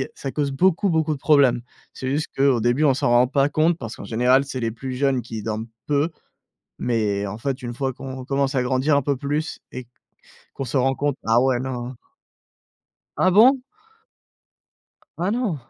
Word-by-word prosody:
ça 135 - -5
cause 145 -1 -1
beaucoup, 185 +7 +2
beaucoup 160 -2 +1
de 145 - -7
problèmes. 140 -5 +4 0.3
C'est 130 - -6
juste 150 +3 -1
qu'au 135 -3 +3
début, 120 +6 +2
on 140 - +5
s'en 125 - 0
rend 120 +1 +5
pas 140 +1 +2
compte, 155 +3 +2
parce 115 -7 -7
qu'en - - -8
général, 125 +5 +3
c'est 130 -2 -5
les 115 -1 -1
plus 130 +3 -6
jeunes 135 -1 +1
qui 110 -2 -7
dorment 110 +1 -3 0.2
peu, 145 +2 +1 0.7
mais 105 -4 0
en 100 +2 -6
fait, 130 +3 -3
une 120 -1 -5
fois 135 +2 -2
qu'on 130 0 -8
commence 140 0 0
à 130 - +2
grandir 130 +3 +2
un - - +2
peu 140 +1 0
plus 145 +4 -3
et 130 -1 -8 0.7
qu'on 135 - -5
se 125 - -6
rend 135 0 +3
compte, 145 0 -1
bah, 115 +1 +3
ouais, 130 -1 +2
non. 125 -1 -5 1.2
Ah 185 - +4
bon? 240 +8 +6 1.6
Ah 180 +3 0
non? 225 -7 -1
135 Hz, 185 wpm, -22 LUFS, 120-145 Hz, 1.6 s, bon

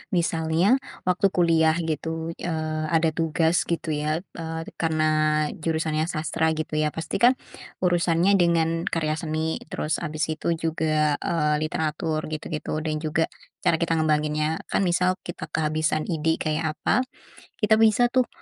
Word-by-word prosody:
misalnya 170 +7 +2 0.3
waktu 180 +2 +3
kuliah 165 -3 +3
gitu, 160 0 -3
eee, 155 -2 -2
ada 165 -1 +3
tugas 165 +1 +1
gitu 170 -1 -2
ya. 155 +3 -1 0.2
Eee, 160 0 -4 0.2
karena 155 -1 +2
jurusannya 160 -1 -1
sastra 160 0 0
gitu 155 0 -4
ya, 155 - +2
pasti 165 +4 -3
kan, 250 +2 +6 0.5
urusannya 175 +1 +3
dengan 165 0 +2
karya 155 -5 0
seni. 160 0 -2
Terus 155 0 -2
habis 155 -1 -2
itu 160 +2 -1
juga, 155 -2 +1
eee, 150 -3 +1
literatur 155 0 -1
gitu-gitu, 155 0 -3
dan 155 -1 -2
juga 160 +1 +1 0.4
cara 165 - +4
kita 165 0 0
ngembanginnya. 155 0 0
Kan - - +2
misal 180 +1 +1
kita 175 - -5
kehabisan 155 0 0
ide, 160 -1 0
kayak 155 0 -1
apa, 255 - +2 0.6
kita 215 0 +4
bisa 225 +2 +5
tuh 255 -2 +2
160 Hz, 140 wpm, -25 LUFS, 155-170 Hz, 0.6 s, kan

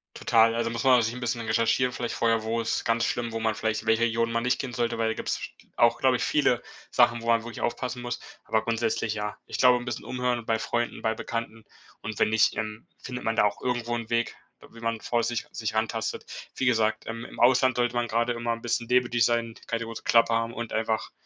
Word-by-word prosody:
Total, 115 0 +4
also 115 0 0
muss 115 -1 -3
man 130 -2 +6
sich 115 0 -1
'n 125 - -7
bisschen 120 -1 -2
recherchieren, 115 +3 +2
vielleicht 120 -1 -3
vorher 115 -1 +2
wo 115 +1 -1
ist 115 - -1
ganz 115 0 +2
schlimm, 120 -1 -2
wo 115 - -3
man 110 0 +1
vielleicht 110 0 -2
welche 110 +1 +3
Regionen 115 0 +1
man 115 - 0
nicht 125 0 +1
kennen 130 -3 -4
sollte, 120 -2 -1
weil 115 -1 +1
da - - 0
gibt's - - -2
sch - - -7 0.2
auch, - - +4
glaub - - +4
ich, - - -1
viele - - +2 0.3
Sachen, 115 0 +3
wo 115 - -7
man 115 -1 +3
wirklich 120 -1 -8
aufpassen 125 +1 -2
muss, 120 0 -4 0.3
aber 110 - +1
grundsätzlich 115 -1 0
ja. 105 -1 -4
Ich - - -5
glaube 125 -1 +6
'n 120 - -6
bisschen - - -5
umhören 125 -2 -1
bei 115 0 +1
Freunden, 120 +1 -2
bei 110 - +2
Bekannten 115 -1 -5 0.4
und 105 -1 -5
wenn - - +4
nicht, 110 0 +3
ähm, 110 0 -5
findet 125 -1 -7
man 115 0 +1
da - - +4
auch 105 - -1
irgendwo 120 -1 -1
'n 115 -1 -5
Weg, 120 0 0 0.4
wie 115 - -13
man 115 -1 -2
vorsichtig 120 +1 -1
sich 110 -1 -3
rantastet. 110 0 -2 0.3
Wie 130 - -1
gesagt, 110 -3 +2
ähm, 115 +1 -5
im - - -11
Ausland 130 0 +4
sollte 120 0 +1
man 120 -1 0
grade 120 +2 +1
immer 120 0 -1
'n 115 - -7
bisschen 120 0 -1
demütig 120 -2 +3
sein, 115 -1 +1
keine 115 -1 -2
große 115 0 -7
Klappe 115 -1 +4
haben 115 0 0
und 120 -1 -5
einfach, 110 0 -1
115 Hz, 235 wpm, -27 LUFS, 115-120 Hz, 0.4 s, man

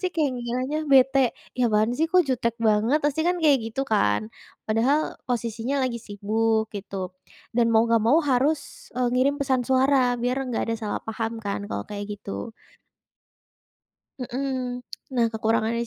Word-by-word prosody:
Pasti 370 - 0
kayak 305 -4 +1
ngiranya 255 +5 -2
bete, 270 -2 +4 0.2
"Ih 245 - +4
apaan 215 +2 +2
sih, 315 +6 +1
kok 365 +1 +5
jutek 245 -4 0
banget" 225 +6 +2
Pasti 295 +1 +1
kan 355 0 +2
kaya 295 -3 +6
gitu 225 +4 -3
kan? 110 - +1 0.3
Padahal 250 +8 +1
posisinya 240 +3 -1
lagi 235 -2 -2
sibuk, 220 +2 0
gitu, 195 -3 -5 0.4
dan 235 0 +3
mau 225 -1 +5
nggak 230 -1 +3
mau 235 +9 +4
harus, 280 +2 0
eee, 250 -1 +2
ngirim 270 +3 +2
pesan 260 -3 0
suara 260 -1 +3
biar 245 +2 -1
enggak 230 -1 -2
ada 225 - 0
salah 210 - -3
paham 225 0 -4
kan 200 0 -3
kalau - - -3
kayak 205 0 -6
gitu. 205 +3 -6 1.7
Hmm. 250 -1 -3 0.3
Nah, 235 - +4
kekurangannya 225 +1 0
240 Hz, 155 wpm, -25 LUFS, 220-270 Hz, 1.7 s, kaya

